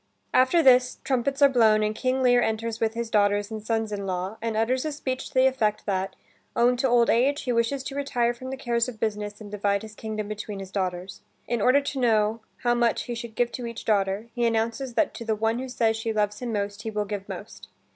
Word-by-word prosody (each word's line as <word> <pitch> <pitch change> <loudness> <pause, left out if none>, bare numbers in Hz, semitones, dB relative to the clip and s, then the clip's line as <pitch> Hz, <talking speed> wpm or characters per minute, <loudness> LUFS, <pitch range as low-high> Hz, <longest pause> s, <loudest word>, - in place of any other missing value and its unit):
After 260 +7 +4
this, 255 -1 +5
trumpets 275 +2 0
are - - +10
blown, 220 -5 +4
and 215 0 0
King 260 +3 0
Lear 245 -1 +5
enters 225 0 -2
with 225 0 0
his 235 -1 -3
daughters 205 0 +2
and 220 -1 -5
sons 225 -1 -1
in 200 -1 -4
law, 185 +2 -3
and 225 -1 -2
utters 250 +4 +1
a 310 - -2
speech 260 -3 -4
to - - -16
the 260 0 +5
effect 225 -6 +1
that, 190 -1 -2 0.4
owing 245 +1 +4
to 265 +2 +1
old 240 -1 +4
age, 270 +5 +2
he 250 - -1
wishes 235 +3 0
to 270 0 -6
retire 245 -4 0
from 255 +2 -8
the 265 - -4
cares 235 -2 0
of 225 -3 -10
business 210 -1 -3
and 210 -2 -10
divide 200 0 0
his 215 -1 -9
kingdom 215 -1 -5
between 210 -1 -5
his 195 -1 -8
daughters. 185 -1 -3 0.3
In 235 -2 -1
order 255 +5 +5
to 280 -1 -4
know 220 -2 +2 0.2
how 240 -1 +3
much 240 -1 +1
he 240 - -5
should 230 -1 -7
give 240 -1 +1
to 245 -2 -5
each 230 -1 -7
daughter, 200 0 +1
he 240 -1 +1
announces 230 +3 -1
that 315 - +2
to - - -7
the 220 -1 0
one 225 +2 0
who 260 0 -5
says 225 -2 +1
she 225 0 -2
loves 210 -1 0
him 245 -2 -4
most 205 -1 -3
he 220 - -4
will 210 -1 -2
give 200 -1 -5
most. - - -8
230 Hz, 240 wpm, -26 LUFS, 210-250 Hz, 0.4 s, are